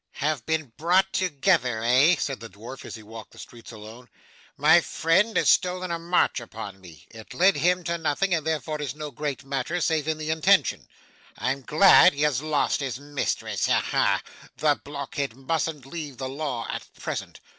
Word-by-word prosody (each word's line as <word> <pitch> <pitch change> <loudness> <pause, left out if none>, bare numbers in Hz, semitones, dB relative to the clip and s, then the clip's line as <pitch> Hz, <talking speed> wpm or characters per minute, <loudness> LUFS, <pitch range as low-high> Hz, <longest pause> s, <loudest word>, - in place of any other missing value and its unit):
'Have 150 -4 -2
been 155 -7 -2
brought 185 +4 +2
together, 145 - +1
eh?' 130 +9 +5
said 135 -2 -3
the 115 - -9
dwarf 115 +7 -10
as - - -7
he 110 - -11
walked 110 +1 -11
the - - -17
streets 115 -1 -12
alone. 110 +3 -12 0.5
'My 160 +4 +6
friend 185 +8 +1
has - - +2
stolen 180 0 +2
a 170 - -2
march 170 -3 +1
upon 110 -4 -9
me. 85 -5 -15
It 110 +2 -12
led 185 +3 +4
him 180 +4 +2
to 170 +1 -2
nothing, 165 +4 0
and 165 -2 0
therefore 155 -1 -2
is 145 -1 -4
no 150 -1 -6
great 145 0 -4
matter, 135 +5 -2
save 160 -3 0
in 160 -1 0
the 155 0 -3
intention. 160 -1 +2 0.5
I'm 135 +2 -2
glad 170 +6 +6
he 145 - -1
has 145 -4 +1
lost 155 -1 0
his 135 -3 -4
mistress. 145 0 -2
Ha - - +3
ha! - - +1 0.3
The 150 -2 +1
blockhead 140 -3 -5
mustn't 150 +1 -3
leave 145 -3 -7
the 130 +1 -4
law 135 -4 -4
at - - -7
present. - - -5
145 Hz, 185 wpm, -25 LUFS, 125-165 Hz, 0.5 s, My